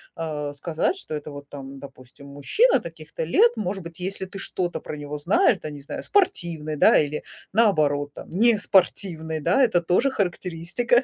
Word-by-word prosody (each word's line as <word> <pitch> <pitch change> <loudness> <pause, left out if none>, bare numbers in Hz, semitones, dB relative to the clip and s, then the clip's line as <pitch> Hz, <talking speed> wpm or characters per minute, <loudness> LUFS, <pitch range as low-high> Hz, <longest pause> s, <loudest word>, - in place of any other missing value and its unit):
а, 150 -3 -4
сказать, 160 - -1
что 155 - -4
это 150 0 -6
вот, 145 0 -10
там, 135 -1 -9
допустим, 135 0 -13
мужчина 145 - +2
таких-то - - -7
лет. 470 0 +4
Может 195 -2 -3
быть, 170 +1 -9
если 190 +1 -2
ты 190 +1 -9
что-то 180 -2 -2
про - - -7
него 145 0 -6
знаешь, 195 - +3
да, 155 - -6
не 145 -1 -9
знаю, 140 - -6
спортивный, 170 - 0
да, - - +6
или, 150 0 -2 0.3
наоборот, 150 -10 +2
там, - - -10
неспортивный, 190 -7 +2
да, 175 - +3
это 200 -8 +3
тоже 180 +11 +2
характеристика, 185 +5 0
170 Hz, 170 wpm, -24 LUFS, 145-200 Hz, 0.3 s, да